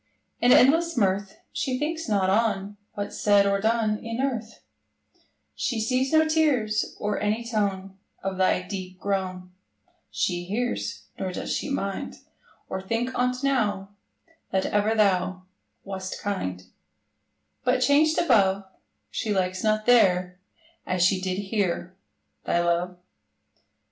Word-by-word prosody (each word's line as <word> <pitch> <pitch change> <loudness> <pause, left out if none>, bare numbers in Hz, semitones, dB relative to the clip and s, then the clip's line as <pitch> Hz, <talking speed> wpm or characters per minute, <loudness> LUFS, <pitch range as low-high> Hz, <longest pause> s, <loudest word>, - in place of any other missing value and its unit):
In 245 - +4
endless 325 +6 +5
mirth, 195 -2 0
She 255 -1 -1
thinks 315 0 -3
not 200 -3 +2
on 205 -1 0 0.2
What's 205 0 -5
said 205 -1 +5
or 200 0 +1
done 220 -1 +1
In 230 +1 -5
earth: 235 -5 -3 0.9
She 235 - -2
sees 255 +4 0
no 315 0 +5
tears, 265 -10 +1
Or 210 0 -1
any 215 +3 -1
tone 195 -4 -2 0.2
Of 190 -1 -3
thy 185 -1 +2
deep 185 -1 -6
groan 185 -2 -3 0.6
She 175 -1 -1
hears; 240 +6 -2 0.2
Nor 190 -1 -2
does - - -3
she - - -3
mind, 200 -8 -3 0.5
Or 190 - -4
think 230 +6 -2
on't 250 +1 0
now, 210 -8 0 0.6
That 190 -1 0
ever 210 +2 +1
thou 185 -3 +2 0.4
Wast 190 -1 -5
kind: 95 - -3 1.0
But 250 0 +2
changed 295 +4 +4
above, 200 - +3 0.5
She 220 - -2
likes 185 -2 0
not 215 0 +1
there, 185 -7 +4 0.4
As 180 -1 0
she 185 +1 +3
did 185 0 -2
here, 195 -3 -2 0.5
Thy 170 - +1
love. 175 +1 0
205 Hz, 130 wpm, -26 LUFS, 190-240 Hz, 1.0 s, endless